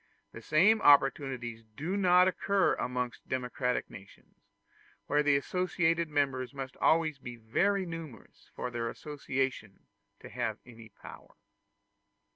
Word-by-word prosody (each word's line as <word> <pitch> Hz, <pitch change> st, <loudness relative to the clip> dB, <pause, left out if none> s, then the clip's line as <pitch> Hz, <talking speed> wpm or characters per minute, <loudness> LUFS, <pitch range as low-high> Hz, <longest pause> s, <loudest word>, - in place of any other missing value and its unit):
The 115 Hz, -, -10 dB
same 185 Hz, -, +4 dB
opportunities 135 Hz, -5 st, +3 dB
do 145 Hz, -, -5 dB
not 180 Hz, -2 st, +5 dB
occur 195 Hz, +1 st, +1 dB
amongst 125 Hz, -1 st, -4 dB
democratic 125 Hz, 0 st, -2 dB
nations, 100 Hz, 0 st, -15 dB, 0.7 s
where 145 Hz, +1 st, +2 dB
the 145 Hz, -1 st, +3 dB
associated 170 Hz, +1 st, 0 dB
members 140 Hz, -3 st, -1 dB
must 135 Hz, -1 st, -6 dB
always 160 Hz, -3 st, +2 dB
be 120 Hz, -2 st, -8 dB
very 185 Hz, -, 0 dB
numerous 165 Hz, -, -10 dB
for 125 Hz, -, -4 dB
their 115 Hz, -1 st, -3 dB
association 135 Hz, -7 st, -4 dB, 0.4 s
to -, -, -11 dB
have -, -, -3 dB
any 115 Hz, -2 st, -13 dB
power. -, -, -14 dB
135 Hz, 120 wpm, -30 LUFS, 125-165 Hz, 0.7 s, not